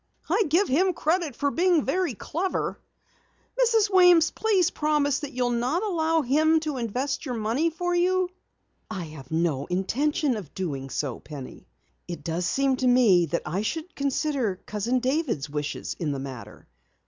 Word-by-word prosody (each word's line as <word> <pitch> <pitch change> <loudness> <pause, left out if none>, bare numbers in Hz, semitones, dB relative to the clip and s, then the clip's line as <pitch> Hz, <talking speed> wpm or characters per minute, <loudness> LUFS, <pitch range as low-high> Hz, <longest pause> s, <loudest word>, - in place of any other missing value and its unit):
"I 390 +6 +2
give 360 +6 +3
him 365 +7 +2
credit 320 -4 0
for 285 +2 0
being 345 -2 +2
very 335 -2 0
clever. 360 - -3 0.8
Mrs. 450 -3 +3
Weems, 355 -3 +6
please 385 -6 +2
promise 295 -2 +1
that 290 -2 -6
you'll 245 -1 0
not 250 - 0
allow 325 -5 +1
him 310 +5 +3
to 305 -3 -3
invest 255 +4 -2
your 255 -5 -3
money 230 +9 0
for 355 +2 -2
you." 365 +1 +2 0.6
"I 195 -5 -4
have 150 -5 -10
no 160 -4 0
intention 255 - 0
of 185 -9 -9
doing 140 -8 -4
so, 130 -1 -3
Penny. 145 -4 -10 0.4
It 175 -1 -6
does 170 +2 -2
seem 270 +2 +1
to 255 - +1
me 220 -9 +5
that 170 +3 -2
I 175 +6 -2
should 320 - -4
consider 275 -7 -1
Cousin 235 +5 -1
David's 255 - -1
wishes 150 0 -4
in 150 -4 -1
the - - -3
matter. 135 -3 -9
270 Hz, 160 wpm, -26 LUFS, -, 0.8 s, Weems